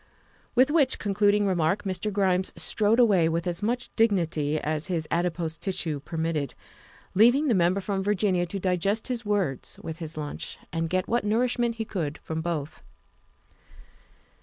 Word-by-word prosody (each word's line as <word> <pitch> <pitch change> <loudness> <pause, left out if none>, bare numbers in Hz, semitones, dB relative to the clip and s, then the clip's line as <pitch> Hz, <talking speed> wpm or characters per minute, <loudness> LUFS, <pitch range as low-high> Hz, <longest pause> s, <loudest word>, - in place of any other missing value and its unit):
With 260 +3 +5
which 290 -5 +3
concluding 205 0 +2
remark 185 +1 +1
Mr. 195 +2 -2
Grimes 190 -2 +1
strode 215 +1 +2
away 195 -9 +5
with 165 +1 -1
as 175 +1 -3
much 240 +3 -2
dignity 165 -9 +1
as 155 +2 -2
his 165 -4 -2
adipose 170 -2 -1
tissue 165 -6 -2
per 155 +4 -7
mitted, 160 -3 -1 0.6
leaving 245 +9 +5
the - - +4
Member 185 +1 +2
from 195 0 -2
Virginia 190 -3 +1
to 195 +3 -4
digest 190 +5 0
his 240 -2 -3
words 190 -11 -1
with 160 0 -5
his 160 -2 -7
lunch, 150 -1 -5 0.2
and 165 0 -1
get 185 +1 0
what 240 +1 +1
nourishment 235 +2 +1
he 225 -1 -3
could 160 -8 -3
from 160 0 -4
both. 160 -3 -4
185 Hz, 160 wpm, -26 LUFS, 165-210 Hz, 0.6 s, With